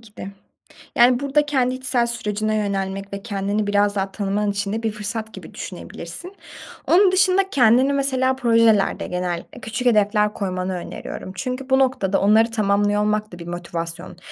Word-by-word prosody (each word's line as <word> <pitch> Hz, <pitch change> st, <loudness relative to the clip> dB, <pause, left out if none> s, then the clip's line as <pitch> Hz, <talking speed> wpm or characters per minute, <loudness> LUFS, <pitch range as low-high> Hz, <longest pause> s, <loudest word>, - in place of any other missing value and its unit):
ki 215 Hz, -2 st, -19 dB
de. -, -, -7 dB, 0.7 s
Yani, 245 Hz, +1 st, +5 dB
burada 285 Hz, +1 st, +1 dB
kendi 255 Hz, -3 st, +1 dB
içsel 255 Hz, -2 st, 0 dB
sürecine 215 Hz, -2 st, -2 dB
yönelmek 195 Hz, -1 st, -3 dB
ve 200 Hz, 0 st, -5 dB
kendini 205 Hz, -1 st, -2 dB
biraz 205 Hz, 0 st, +2 dB
daha 195 Hz, 0 st, -2 dB
tanıman 205 Hz, 0 st, -1 dB
için 200 Hz, 0 st, -2 dB
de 225 Hz, +1 st, -3 dB
bir 225 Hz, -, 0 dB
fırsat 215 Hz, +1 st, -5 dB
gibi -, -, -11 dB
düşünebilirsin. 365 Hz, +3 st, -8 dB, 0.5 s
Onun 375 Hz, +2 st, +5 dB
dışında 380 Hz, +1 st, +3 dB
kendini 255 Hz, +2 st, +4 dB
mesela 260 Hz, -1 st, +1 dB
projelerde 230 Hz, -5 st, +2 dB
genellikle 180 Hz, -1 st, -4 dB
küçük 225 Hz, +3 st, -3 dB
hedefler 210 Hz, -1 st, +3 dB
koymanı 185 Hz, -1 st, -3 dB
öneriyorum. 180 Hz, +1 st, -7 dB
Çünkü 255 Hz, +4 st, -4 dB
bu 265 Hz, -, +4 dB
noktada 250 Hz, -8 st, +1 dB
onları 220 Hz, +3 st, +4 dB
tamamlıyor 205 Hz, -1 st, +1 dB
olmak 210 Hz, 0 st, 0 dB
da 175 Hz, -, -9 dB
bir 170 Hz, -, -9 dB
motivasyon 170 Hz, 0 st, -6 dB
215 Hz, 160 wpm, -21 LUFS, 200-255 Hz, 0.7 s, Yani